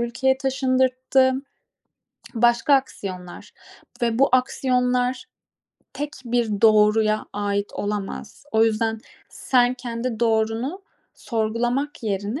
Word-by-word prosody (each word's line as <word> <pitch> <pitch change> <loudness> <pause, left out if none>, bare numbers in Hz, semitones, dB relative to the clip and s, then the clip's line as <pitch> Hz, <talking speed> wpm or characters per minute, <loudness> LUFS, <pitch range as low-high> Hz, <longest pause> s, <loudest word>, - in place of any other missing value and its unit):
ülkeye 265 +3 0
taşındırttı. 260 0 +2 1.0
Başka 240 +4 +3
aksiyonlar 185 -9 -4 0.5
ve 230 -1 +1
bu 275 - +5
aksiyonlar 250 0 +1 0.7
tek 295 +1 -4 0.2
bir 230 -4 -1
doğruya 215 0 +4
ait 205 0 -2
olamaz. 205 +5 -5
O 220 0 +4
yüzden 225 0 0 0.3
sen 250 -1 +1
kendi 235 -1 -5
doğrunu 230 - 0 0.3
sorgulamak 240 +5 -2
yerine 205 +4 -2
235 Hz, 90 wpm, -23 LUFS, 215-255 Hz, 1.0 s, bu